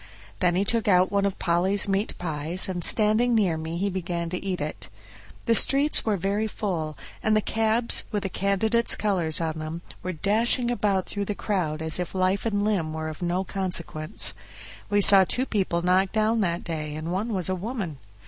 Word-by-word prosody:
Then 175 -2 +1
he 195 +2 +1
took 230 0 0
out 185 -1 +3
one 200 0 +1
of 195 - -5
Polly's 185 +4 +1
meat 195 +2 -1
pies, 160 +1 +1
and 180 -2 -3
standing 220 +5 +4
near 195 -7 +2
me, 160 +1 -5
he 195 +3 -1
began 175 -3 -3
to 180 - -4
eat 190 -2 -3
it. 150 -8 -6 0.6
The 230 - +3
streets 275 +6 +3
were 215 -3 0
very 200 +4 -1
full, 170 -8 -4 0.2
and 215 0 +1
the - - +4
cabs, 225 +2 +2
with 205 -2 -2
the - - -1
candidates' 215 +5 +2
colors 180 -7 +1
on 160 -1 -3
them, 155 +2 -6 0.2
were 185 - -4
dashing 225 +7 +1
about 200 -5 0
through 205 -1 -4
the 205 - -3
crowd 160 -8 -2
as 160 +2 0
if 180 +1 -5
life 190 +3 0
and 205 -2 -1
limb 175 -7 -1
were 160 0 -4
of 155 - -10
no 175 +2 -1
consequence; 180 -2 +1 0.6
we 205 0 +2
saw 195 -1 +7
two 250 +7 0
people 185 -7 -1
knocked 185 +2 +2
down 220 +1 +1
that 170 -3 -1
day, 155 -3 -5
and 155 +2 -5
one 205 +6 -2
was 185 -5 -2
a 185 - 0
woman. 185 - -5
190 Hz, 195 wpm, -25 LUFS, 170-210 Hz, 0.6 s, saw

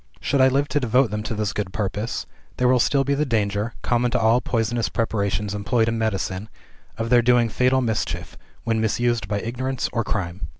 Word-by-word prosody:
Should 140 -1 +1
I 130 - +7
live 140 +2 +1
to 145 - +1
devote 125 -1 +2
them 105 0 -2
to 110 +1 -4
this 105 -1 -1
good 100 -3 -3
purpose, 105 +2 -3 0.3
there 125 - +2
will 125 0 +4
still 135 +3 +3
be 140 +1 0
the 145 +2 +1
danger 105 -3 -1
(common 120 0 +1
to - - 0
all 115 +2 +3
poisonous 115 -1 -1
preparations 105 -2 -1
employed 105 +3 +1
in 115 0 -1
medicine) 105 -2 -2 0.5
of 115 +1 -3
their 120 -1 +6
doing 120 -1 +3
fatal 130 +3 +2
mischief, 110 -3 -2 0.3
when 115 -1 0
misused 120 -1 0
by 105 0 -1
ignorance 130 +3 -2
or 115 -1 0
crime. 95 -4 -3
115 Hz, 200 wpm, -23 LUFS, 105-125 Hz, 0.5 s, I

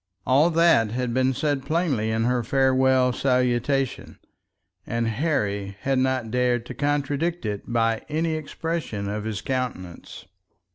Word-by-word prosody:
All 140 +6 +4
that 165 -10 +4
had 120 +1 -2
been 130 +1 +2
said 140 +1 -1
plainly 140 -8 0
in 110 0 0
her 125 0 +1
farewell 130 0 +3
salutation, 125 +1 0 0.7
and 115 0 -1
Harry 105 -6 -1
had 135 -1 +1
not 130 -3 0
dared 125 -1 +1
to - - -7
contradict 145 +2 -1
it 105 +2 -4
by 115 -1 +1
any 160 +2 0
expression 155 -8 -4
of 105 +1 -4
his 105 -3 -3
countenance. 125 -10 -5
130 Hz, 135 wpm, -24 LUFS, 115-145 Hz, 0.7 s, All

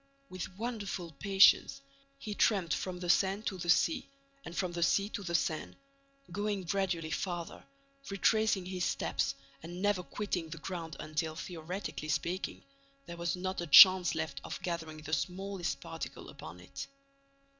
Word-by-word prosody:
With 185 0 -7
wonderful 205 -7 -4
patience, 195 +7 +5 0.4
he 215 -6 -5
tramped 195 -6 +2
from 180 -1 -3
the 175 - -4
Seine 195 +4 +3
to 190 -4 -3
the 175 - -4
sea, 270 - +3 0.3
and 170 - -8
from 185 -2 0
the 170 0 -4
sea 200 +4 +3
to 215 - -5
the 170 -3 -2
Seine, 160 -2 -1 0.6
going 205 +1 -2
gradually 175 -3 -1
farther, 175 -1 -4 0.5
retracing 200 -1 +2
his 185 -1 -3
steps 90 - 0 0.3
and 175 +2 -8
never 205 -1 +2
quitting 180 -3 -3
the 165 - -7
ground 165 -2 -5
until, 155 +1 -3
theoretically 170 -1 -5
speaking, 170 +6 -2 0.4
there 170 - -7
was 170 +1 -1
not 185 0 -3
a 175 - -4
chance 185 +3 +9
left 160 0 -3
of - - -5
gathering 160 -3 -4
the 155 +1 -6
smallest 180 +5 -2
particle - - -7
upon 80 +3 -10
it. 90 - -8
180 Hz, 155 wpm, -32 LUFS, 165-195 Hz, 0.6 s, chance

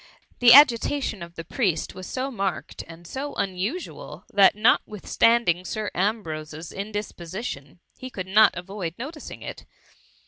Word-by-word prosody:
The 245 -1 +7
agitation 265 - +5
of 170 0 -9
the 165 - -6
priest 185 - -1
was 185 -1 -9
so 265 +1 -3
marked 195 -8 -3
and 165 +1 -13
so 275 +9 -5
unusual, 195 - -4
that 200 -1 +6
notwithstanding 215 -3 +2
Sir 215 +2 -4
Ambrose's 165 -6 -3
indisposition, 190 - -6 0.2
he 255 - -7
could 185 -7 -6
not 210 +1 +5
avoid 180 -2 -5
noticing 300 +5 -8
it. - - -8
200 Hz, 130 wpm, -25 LUFS, 175-235 Hz, 0.2 s, The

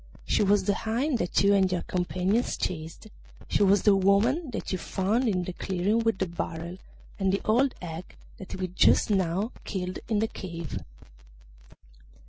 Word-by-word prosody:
She - - +2
was 205 0 +3
the 205 - +2
hind 240 +6 -1
that 175 - +1
you 200 0 +5
and 190 -2 +3
your 180 -1 -1
companions 185 +5 0
chased; 160 +1 -4 0.4
she - - 0
was 200 -1 +4
the 205 -2 +6
woman 210 - +2
that - - -5
you 185 - -1
found 210 +9 0
in 185 -4 +1
the 180 - -5
clearing 190 +5 0
with 225 -3 +1
the 190 - 0
barrel, 170 +1 -5 0.4
and 190 -1 +2
the 195 - 0
old 250 +5 +3
hag 165 +1 -7 0.2
that 190 - -7
we 185 -1 -2
just 185 +4 +4
now 190 +3 +1
killed 185 -2 -4
in 220 - +1
the 220 +2 +2
cave. 170 -6 -6
195 Hz, 170 wpm, -27 LUFS, 180-215 Hz, 0.4 s, the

